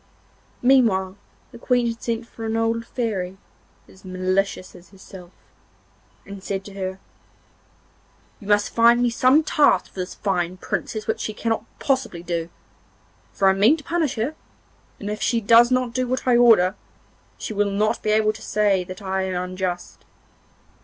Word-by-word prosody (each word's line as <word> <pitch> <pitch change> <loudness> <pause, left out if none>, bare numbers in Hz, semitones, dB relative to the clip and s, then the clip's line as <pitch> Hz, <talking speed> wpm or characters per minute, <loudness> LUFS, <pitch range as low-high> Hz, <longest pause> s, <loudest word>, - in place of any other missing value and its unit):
Meanwhile 220 -8 +3 0.4
the 235 - -12
Queen 245 0 +1
had 230 -1 -3
sent 230 0 -3
for 230 - -11
an 225 0 -1
old 230 0 -1
Fairy, 195 -6 -3 0.5
as 190 - -19
malicious 185 0 -2
as 175 -1 -16
herself, 190 -2 -13 1.0
and 200 -1 -10
said 195 -1 -4
to 200 - -10
her: 190 -1 -4 1.4
'You 200 - -12
must 205 0 +2
find 235 +1 +5
me 240 - +2
some 255 +6 +4
task 300 -1 +2
for - - -9
this 180 +1 -5
fine 185 -3 -2
Princess 215 +3 -4
which - - -2
she 215 - -4
cannot 225 -1 -2
possibly 255 -11 -1
do, 170 -1 -3 0.8
for 195 - +1
I 190 - +5
mean 215 +11 +4
to 295 - -12
punish 330 -4 -1
her, 235 +7 -2 0.7
and 205 - -7
if 210 0 -4
she 235 - +1
does 230 +2 +6
not 255 -2 0
do 255 +1 -1
what 255 +1 -3
I 250 - +5
order, 225 -6 +5 0.6
she - - -5
will 205 0 +1
not 210 +3 0
be 215 - -2
able 215 0 +3
to 215 - -12
say 205 -3 +1
that 185 +2 -10
I 190 0 -1
am 180 0 -3
unjust. 185 -1 -5
210 Hz, 165 wpm, -22 LUFS, 190-235 Hz, 1.4 s, does